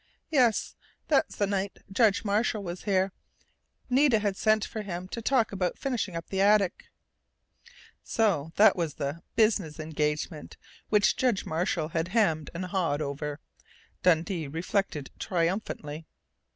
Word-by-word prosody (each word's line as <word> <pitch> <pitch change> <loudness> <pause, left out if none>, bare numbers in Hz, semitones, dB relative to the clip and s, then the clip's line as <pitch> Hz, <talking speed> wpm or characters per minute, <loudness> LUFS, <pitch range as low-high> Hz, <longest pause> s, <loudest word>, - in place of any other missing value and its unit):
Yes, 250 -7 +2 0.3
that's - - +2
the 205 - +1
night 195 0 -2
Judge 215 +1 +3
Marshall 210 +1 +1
was 175 0 -6
here. 190 -1 +2 0.8
Nita 260 -1 +4
had 205 -2 -1
sent 215 +1 +2
for 220 - -5
him 185 -3 -5
to 230 - -5
talk 235 -1 +2
about 185 -3 -1
finishing 240 -9 -2
up 165 - -6
the 190 0 0
attic 200 -2 +3 0.6
" - - -25
So 180 -9 +2
that 215 +2 +6
was 165 -5 -2
the 145 +3 -4
"business 205 -9 +2
engagement" 150 0 -3 0.3
which 210 0 +3
Judge 245 -7 +1
Marshall 160 -1 -1
had 165 0 -1
hemmed 180 -7 +1
and 180 +2 -3
hawed 175 -5 0
over, 145 +1 -4 0.6
Dundee 165 -2 +2
reflected 165 -1 -2
triumphantly. 165 -4 -2
190 Hz, 140 wpm, -28 LUFS, 160-210 Hz, 0.8 s, that